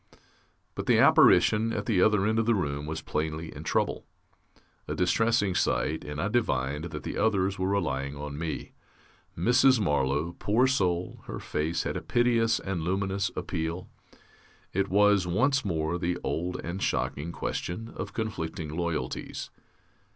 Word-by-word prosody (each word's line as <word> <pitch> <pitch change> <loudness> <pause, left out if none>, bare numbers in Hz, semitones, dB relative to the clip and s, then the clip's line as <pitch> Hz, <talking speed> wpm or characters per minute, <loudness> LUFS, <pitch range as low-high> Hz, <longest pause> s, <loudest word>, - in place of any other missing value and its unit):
But - - -5
the - - +5
apparition 110 +2 +5
at - - -3
the 100 -6 +2
other 105 -1 +4
end 110 +1 +2
of 115 - 0
the 115 - +4
room 75 -5 -2
was 80 +1 -4
plainly 80 +1 -3
in - - -7
trouble. - - -1 0.8
A - - -3
distressing 105 +2 +2
sight, 80 -3 0
and 75 0 -6
I 95 - 0
divined 75 - 0
that 75 -3 -6
the - - -4
others 95 -3 +1
were 95 - 0
relying 70 -8 -1
on 70 0 -6
me. 80 -1 -4 0.7
Mrs. 125 +7 +4
Marlow, 75 -1 0
poor 115 +5 +3
soul, 90 -9 0
her - - -5
face 80 +3 -2
had - - -3
a - - -3
piteous 115 -2 +2
and 95 -3 -3
luminous 95 +3 -1
appeal. 85 +1 -4 0.8
It 100 +1 0
was, 105 -1 +4
once 135 +10 +2
more, 80 -3 -1
the 90 0 -1
old 90 +2 -2
and 90 +3 -4
shocking 80 +4 -1
question 110 +6 -4
of - - -5
conflicting 80 -8 -4
loyalties. 85 -7 -3
90 Hz, 150 wpm, -28 LUFS, 80-105 Hz, 0.8 s, the